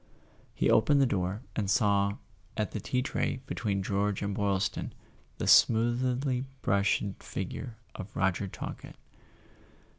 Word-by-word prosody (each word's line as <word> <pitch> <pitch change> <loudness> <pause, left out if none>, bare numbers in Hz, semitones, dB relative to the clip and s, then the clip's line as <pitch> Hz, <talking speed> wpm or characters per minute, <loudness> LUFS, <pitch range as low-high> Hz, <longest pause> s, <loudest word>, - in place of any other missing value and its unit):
He - - +1
opened 140 +6 +4
the 135 - +5
door, 100 -1 -1
and 100 -3 -1
saw, 100 -3 +3 0.4
at 105 -2 -1
the 110 - -3
tea 125 +5 -1
tray 135 - -1
between 100 -6 -2
George 100 +1 0
and 100 0 -1
Boylston, 100 -1 -1 0.4
the - - -3
smoothly 125 +3 +3 0.2
brushed 100 +1 +2 0.2
figure 110 +5 -5 0.2
of 95 - -9
Roger 95 +1 +1
Talkett. - - -8
105 Hz, 125 wpm, -30 LUFS, 100-120 Hz, 0.4 s, the